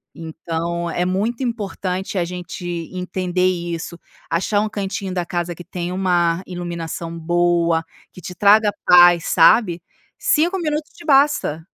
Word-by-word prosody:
Então 165 Hz, +1 st, -4 dB
é 175 Hz, -, -1 dB
muito 210 Hz, +8 st, -1 dB
importante 195 Hz, -5 st, -3 dB
a 180 Hz, -, +2 dB
gente 180 Hz, 0 st, -7 dB, 0.3 s
entender 180 Hz, 0 st, -2 dB
isso. 170 Hz, -1 st, -3 dB, 0.3 s
Achar 190 Hz, +5 st, +1 dB
um 215 Hz, -, -1 dB
cantinho 195 Hz, -2 st, -4 dB
da 180 Hz, -1 st, -2 dB
casa 175 Hz, 0 st, -3 dB
que 175 Hz, -, -10 dB
tem 175 Hz, 0 st, -5 dB
uma 175 Hz, -2 st, +1 dB
iluminação 170 Hz, -2 st, -5 dB
boa, 170 Hz, 0 st, +1 dB, 0.3 s
que 180 Hz, -, -12 dB
te 180 Hz, -, -7 dB
traga 210 Hz, +3 st, +5 dB
paz, 175 Hz, -1 st, +7 dB
sabe, 175 Hz, 0 st, +4 dB, 0.4 s
5 340 Hz, +5 st, +2 dB
minutos 305 Hz, -2 st, -3 dB
te 340 Hz, -, -14 dB
basta. 275 Hz, -, +3 dB
180 Hz, 140 wpm, -20 LUFS, 170-200 Hz, 0.4 s, paz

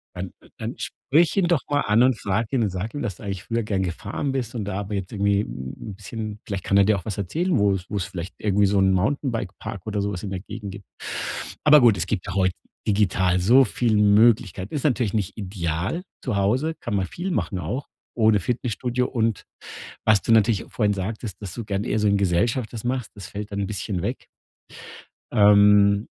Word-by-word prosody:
Dann 90 Hz, 0 st, -5 dB, 0.3 s
dann -, -, -5 dB
sprich 155 Hz, +5 st, +1 dB
ihn 185 Hz, -, +3 dB
doch 170 Hz, -5 st, +2 dB
mal 145 Hz, 0 st, +2 dB
an 110 Hz, +3 st, +4 dB
und 130 Hz, -4 st, +3 dB
frag 105 Hz, +3 st, -1 dB
ihn 125 Hz, -, +2 dB
und 105 Hz, -, +1 dB
sag 95 Hz, +4 st, -4 dB
ihm, 145 Hz, -, -4 dB
dass 100 Hz, -9 st, -3 dB
du -, -, -14 dB
eigentlich 100 Hz, -1 st, -4 dB
früher 115 Hz, 0 st, -1 dB
gern 100 Hz, -3 st, -1 dB
gefahren 100 Hz, -, -3 dB
bist 125 Hz, -3 st, -3 dB
und 105 Hz, -4 st, -3 dB
da 100 Hz, -1 st, -3 dB
aber 105 Hz, +1 st, -6 dB
jetzt 95 Hz, -2 st, -3 dB
irgendwie 100 Hz, -1 st, +2 dB
'n 80 Hz, +6 st, -7 dB
bisschen 105 Hz, +1 st, -6 dB
vielleicht 100 Hz, -3 st, -4 dB
kann 100 Hz, -, +2 dB
er 100 Hz, -, +7 dB
dir 105 Hz, 0 st, +3 dB
auch 90 Hz, -, -8 dB
was 105 Hz, -, -4 dB
erzählen, 165 Hz, -, 0 dB
wo's 100 Hz, -3 st, +1 dB
wo's 100 Hz, -3 st, -2 dB
vielleicht 90 Hz, +1 st, -7 dB
irgendwie 100 Hz, -1 st, +2 dB
so 100 Hz, +1 st, +1 dB
'n 95 Hz, 0 st, +4 dB
Mountainbike-Park 105 Hz, -, -2 dB
oder 105 Hz, -1 st, -1 dB
so 100 Hz, +1 st, -1 dB
was 90 Hz, -3 st, -5 dB
in 100 Hz, -, -4 dB
der 95 Hz, -1 st, -3 dB
Gegend 100 Hz, 0 st, -7 dB
gibt. 100 Hz, 0 st, -10 dB, 0.8 s
Aber 150 Hz, -2 st, +8 dB
gut, 115 Hz, -5 st, +5 dB
es 85 Hz, -, -1 dB
gibt 95 Hz, -3 st, -3 dB
ja -, -, -4 dB
heute 95 Hz, -2 st, +2 dB, 0.3 s
digital 95 Hz, -3 st, +2 dB
so 120 Hz, +9 st, +6 dB
viel 115 Hz, +1 st, 0 dB
Möglichkeiten. 105 Hz, -2 st, +3 dB
Ist 145 Hz, -, -2 dB
natürlich 125 Hz, -8 st, +1 dB
nicht 105 Hz, -3 st, -2 dB
ideal 95 Hz, -, -3 dB, 0.2 s
zu 125 Hz, -6 st, -1 dB
Hause, 125 Hz, +12 st, +1 dB
kann -, -, -3 dB
man 95 Hz, -2 st, 0 dB
viel 180 Hz, -, -4 dB
machen 100 Hz, -, -1 dB
auch 130 Hz, +8 st, -4 dB, 0.3 s
ohne 110 Hz, -3 st, +4 dB
Fitnessstudio. 125 Hz, +3 st, -1 dB
Und 115 Hz, -4 st, -1 dB, 0.6 s
was 110 Hz, -2 st, +4 dB
du -, -, -3 dB
natürlich 110 Hz, -2 st, +4 dB
vorhin 105 Hz, -3 st, +1 dB
sagtest, 100 Hz, +1 st, -5 dB
dass 95 Hz, -4 st, -5 dB
du 115 Hz, -, -5 dB
gern 100 Hz, -1 st, -2 dB
eher 110 Hz, -, 0 dB
so 105 Hz, -, +1 dB
in 100 Hz, -, +3 dB
Gesellschaft 100 Hz, +6 st, +1 dB
das 115 Hz, -1 st, -7 dB
machst, 125 Hz, -3 st, -2 dB
das 100 Hz, -3 st, -8 dB
fällt 105 Hz, +1 st, -6 dB
dann 100 Hz, -1 st, -2 dB
bisschen 95 Hz, -2 st, -3 dB
weg. -, -, -4 dB, 1.1 s
Ähm. 100 Hz, -1 st, +6 dB
105 Hz, 210 wpm, -24 LUFS, 95-115 Hz, 1.1 s, Aber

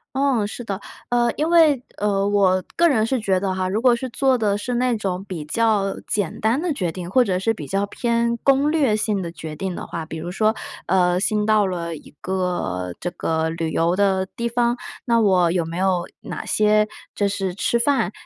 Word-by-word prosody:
嗯， 265 Hz, -6 st, +2 dB
是 220 Hz, -, -7 dB
的。 200 Hz, -4 st, -4 dB, 0.3 s
呃， 240 Hz, -1 st, +2 dB
因 305 Hz, +2 st, +1 dB
为， 315 Hz, -7 st, +5 dB
呃， 200 Hz, -1 st, +1 dB
我 190 Hz, -2 st, +3 dB
个 340 Hz, -, +5 dB
人 235 Hz, -9 st, +3 dB
是 260 Hz, +2 st, 0 dB
觉 195 Hz, -4 st, +1 dB
得 190 Hz, -1 st, -1 dB
哈， 185 Hz, 0 st, -1 dB
如 210 Hz, +3 st, 0 dB
果 245 Hz, -1 st, +4 dB
是 255 Hz, +1 st, -5 dB
做 265 Hz, +2 st, +2 dB
的 205 Hz, -3 st, 0 dB
是 245 Hz, +4 st, -3 dB
那 250 Hz, 0 st, +1 dB
种 190 Hz, -2 st, -3 dB
比 180 Hz, -5 st, -6 dB
较 205 Hz, +1 st, +1 dB
简 205 Hz, -5 st, -1 dB
单 225 Hz, +7 st, +1 dB
的 355 Hz, -, -1 dB
决 180 Hz, -9 st, -2 dB
定， 175 Hz, 0 st, -6 dB
或 250 Hz, +3 st, +4 dB
者 185 Hz, -3 st, 0 dB
是 225 Hz, +4 st, 0 dB
比 150 Hz, -8 st, -7 dB
较 195 Hz, +4 st, 0 dB
偏 235 Hz, +2 st, 0 dB
攻 275 Hz, +2 st, +3 dB
略 285 Hz, -9 st, +2 dB
性 210 Hz, -2 st, 0 dB
的 170 Hz, -1 st, -5 dB
决 160 Hz, -2 st, -7 dB
定 190 Hz, +2 st, -3 dB
的 -, -, -6 dB
话， 165 Hz, -1 st, -5 dB
比 160 Hz, 0 st, -7 dB
如 175 Hz, +3 st, -5 dB
说， 215 Hz, +3 st, +2 dB, 0.3 s
呃， 180 Hz, -1 st, +3 dB
新 210 Hz, +2 st, +1 dB
到 215 Hz, -2 st, +4 dB
了 170 Hz, -3 st, -3 dB
一 -, -, -15 dB
个 175 Hz, -, -2 dB
这 175 Hz, -, -2 dB
个 160 Hz, -2 st, -1 dB
旅 165 Hz, 0 st, -3 dB
游 170 Hz, +3 st, +1 dB
的 190 Hz, -1 st, +2 dB
地 235 Hz, 0 st, -2 dB
方， 240 Hz, 0 st, +1 dB, 0.3 s
那 235 Hz, -1 st, +3 dB
我 185 Hz, -6 st, +4 dB
有 170 Hz, -1 st, 0 dB
没 165 Hz, +2 st, -5 dB
有 185 Hz, -2 st, +1 dB
哪 -, -, -6 dB
些 215 Hz, 0 st, +3 dB, 0.3 s
就 205 Hz, -, +1 dB
是 195 Hz, -2 st, -2 dB
吃 235 Hz, +4 st, +1 dB
饭 235 Hz, -6 st, +1 dB
200 Hz, 230 characters per minute, -22 LUFS, 180-235 Hz, 0.3 s, 为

